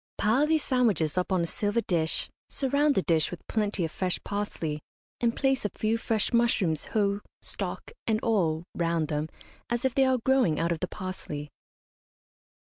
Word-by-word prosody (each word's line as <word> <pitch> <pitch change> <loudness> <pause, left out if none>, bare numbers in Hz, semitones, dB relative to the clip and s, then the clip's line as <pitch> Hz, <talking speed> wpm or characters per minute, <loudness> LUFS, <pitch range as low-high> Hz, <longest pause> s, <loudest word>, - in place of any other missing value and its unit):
Pile 250 +8 +3
these 315 -2 +2
sandwiches 215 - +2
up 180 +1 0
on 185 -2 +2
a - - +1
silver 205 +6 0
dish, 165 -6 +1 0.2
surround 285 +2 +2
the 190 - +2
dish 160 -2 +2
with 180 - -8
plenty 210 -5 0
of 160 - -5
fresh 185 +1 -1
parsley, 170 -7 -3 0.4
and 235 -1 +1
place 270 -1 +1
a 210 - 0
few 215 +4 0
fresh 225 -1 -1
mushrooms 215 -9 +2
whole, 200 -2 +1 0.2
stalk - - -3 0.2
and 220 -1 +2
all, 170 -8 +1
round 165 -2 0
them, 150 +1 -1 0.4
as 240 +2 0
if 260 - +2
they 270 - +4
are 260 -1 +3
growing 260 - +3
out 170 +1 +1
of 165 - -1
the 185 - -1
parsley. 150 -6 -6
205 Hz, 175 wpm, -28 LUFS, 165-235 Hz, 0.4 s, they